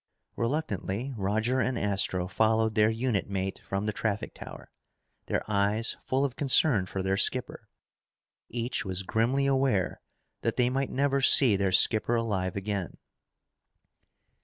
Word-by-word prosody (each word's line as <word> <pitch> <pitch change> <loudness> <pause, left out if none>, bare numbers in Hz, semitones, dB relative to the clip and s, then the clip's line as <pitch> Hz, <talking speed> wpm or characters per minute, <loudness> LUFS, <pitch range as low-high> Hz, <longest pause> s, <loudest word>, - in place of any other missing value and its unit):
Reluctantly, 120 - -3
Roger 110 +5 0
and 125 0 0
Astro 95 -3 0
followed 110 +2 +1
their 105 0 +3
unit 115 -3 -1
mate 95 -1 -3
from 95 +1 -3
the 105 - -2
traffic 105 -1 -3
tower, - - -11 0.6
their - - -1
eyes 105 +2 0
full 135 +2 0
of 130 - -4
concern 130 -8 +3
for 95 0 -4
their 95 +1 0
skipper. 125 +4 0 0.8
Each 120 +1 -3
was 95 -1 -2
grimly 120 +8 0
aware 135 -9 0 0.4
that - - -1
they 125 0 +2
might 135 +1 -1
never 140 0 0
see 130 -4 +6
their 95 -1 0
skipper 110 +5 +4
alive 100 -6 -1
again. 100 -2 -4
110 Hz, 135 wpm, -28 LUFS, 100-125 Hz, 0.8 s, see